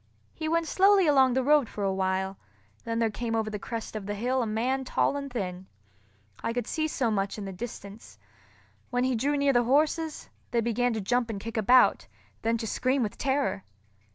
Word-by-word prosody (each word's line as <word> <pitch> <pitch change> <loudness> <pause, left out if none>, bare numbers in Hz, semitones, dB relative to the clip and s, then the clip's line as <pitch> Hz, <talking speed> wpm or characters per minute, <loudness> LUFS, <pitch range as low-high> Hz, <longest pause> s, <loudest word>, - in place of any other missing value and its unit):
He 315 -1 -4
went 335 0 +1
slowly 390 +1 +4
along 265 -4 +4
the 260 - +2
road 290 -2 +4
for 205 - -5
a 195 -1 +1
while, 190 0 -1 0.5
then 230 0 -2
there 230 -1 +1
came 230 +1 -3
over 220 -1 -1
the 210 - -4
crest 225 +1 -6
of 205 -2 -5
the 205 - -2
hill 250 +5 0
a 235 - -1
man 250 +5 -1
tall 265 - +1
and 280 -1 -5
thin. 185 -5 -4 0.8
I 230 - -1
could 245 -2 -2
see 315 +4 -1
so 250 -6 0
much 195 -1 -1
in 205 - -5
the 195 - -6
distance. 205 0 -9 0.7
When 245 0 0
he 260 0 +1
drew 280 +5 0
near 280 -1 +3
the 240 - +4
horses, 310 +4 +1 0.2
they 235 - +1
began 235 +1 0
to 220 - -2
jump 240 +4 0
and 210 -3 -4
kick 230 +3 -7
about, 245 +4 +4 0.3
then 230 +1 +1
to 225 - -5
scream 255 +4 0
with 210 - -3
terror. 270 -7 0
235 Hz, 210 wpm, -28 LUFS, 215-270 Hz, 0.8 s, slowly